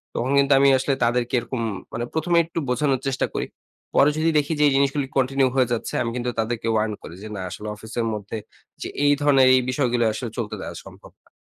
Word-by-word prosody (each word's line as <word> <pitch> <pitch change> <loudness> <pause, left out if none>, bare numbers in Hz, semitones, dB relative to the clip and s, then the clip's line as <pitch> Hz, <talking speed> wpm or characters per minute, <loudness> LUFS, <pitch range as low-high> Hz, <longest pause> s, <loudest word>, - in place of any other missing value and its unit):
তখন 125 +3 -1
কিন্তু 140 0 +4
আমি 140 0 +6
আসলে 130 +1 0
তাদেরকে 120 +1 0
এরকম 120 0 -5 0.3
মানে 120 - -2
১ম 160 +2 -2
এ - - +7
একটু 165 0 -4
বোঝানোর 135 0 +1
চেষ্টা 135 0 0
করি। - - -2 0.5
পরে 140 - +6
যদি 160 +1 +2
দেখি 150 +2 +1
যে - - +4
এই 140 - +2
জিনিসগুলো 140 0 +1
continue 135 0 +2
হয়ে 130 -2 +3
যাচ্ছে 115 - -3
আমি 115 - -1
কিন্তু 125 0 -2
তাদেরকে 115 0 -2
warn 110 0 0
করি 80 - -9
যে - - -6
না 95 - -5
আসলে 105 - -7
অফিসের 110 +2 -4
মধ্যে 105 +1 -5 0.4
যে - - -3 0.2
এই 145 - +5
ধরণের 135 -3 +5
এই 130 - +4
বিষয়গুলো 125 -2 +1
আসলে 120 +1 -4
চলতে 110 -3 -3
দেওয়া - - -7
সম্ভব - - -14
না। - - -28
130 Hz, 220 wpm, -23 LUFS, 115-140 Hz, 0.5 s, এ